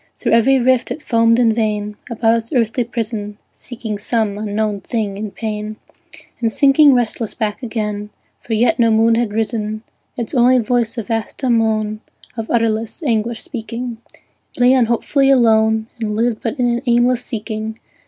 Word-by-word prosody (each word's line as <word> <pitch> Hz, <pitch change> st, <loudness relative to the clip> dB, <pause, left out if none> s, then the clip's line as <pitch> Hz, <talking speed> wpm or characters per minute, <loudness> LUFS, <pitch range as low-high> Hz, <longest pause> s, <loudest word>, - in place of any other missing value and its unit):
Through -, -, -1 dB
every 245 Hz, +4 st, +4 dB
rift 255 Hz, 0 st, +2 dB
it -, -, -4 dB
foamed 230 Hz, -2 st, +3 dB
in 235 Hz, -2 st, +3 dB
vain, 210 Hz, -2 st, -1 dB
About 225 Hz, -1 st, +2 dB
its 230 Hz, 0 st, -4 dB
earthly 240 Hz, -2 st, +1 dB
prison, 220 Hz, -3 st, -4 dB, 0.2 s
Seeking 225 Hz, -4 st, -7 dB
some 215 Hz, -1 st, -1 dB
unknown 210 Hz, 0 st, -2 dB
thing 215 Hz, -5 st, -3 dB
in 210 Hz, +1 st, -5 dB
pain, 215 Hz, 0 st, -5 dB, 0.6 s
And 230 Hz, -2 st, 0 dB
sinking 280 Hz, +2 st, +5 dB
restless 230 Hz, -2 st, -2 dB
back 215 Hz, +2 st, -3 dB
again, 210 Hz, -3 st, -3 dB, 0.3 s
For 225 Hz, -, -3 dB
yet 245 Hz, +7 st, +2 dB
no 230 Hz, -1 st, +4 dB
moon 225 Hz, +1 st, +4 dB
had 230 Hz, -2 st, 0 dB
risen: 215 Hz, 0 st, -2 dB, 0.3 s
Its 235 Hz, +2 st, -4 dB
only 255 Hz, 0 st, +5 dB
voice 240 Hz, 0 st, 0 dB
a 230 Hz, -, -2 dB
vast 225 Hz, +2 st, -3 dB
dumb 245 Hz, -4 st, +2 dB
moan, 215 Hz, -1 st, -1 dB, 0.3 s
Of 225 Hz, -1 st, -5 dB
utterless 230 Hz, +4 st, -1 dB
anguish 230 Hz, -3 st, -1 dB
speaking, 235 Hz, -1 st, -6 dB, 0.6 s
It -, -, -11 dB
lay 245 Hz, +1 st, +5 dB
unhopefully 260 Hz, +3 st, +2 dB
alone, 220 Hz, -4 st, +4 dB
And 215 Hz, -2 st, -2 dB
lived 230 Hz, 0 st, 0 dB
but 235 Hz, +4 st, -3 dB
in 250 Hz, -, +2 dB
an 240 Hz, 0 st, 0 dB
aimless 240 Hz, +1 st, +3 dB
seeking. 220 Hz, -1 st, -5 dB
225 Hz, 165 wpm, -18 LUFS, 215-240 Hz, 0.6 s, sinking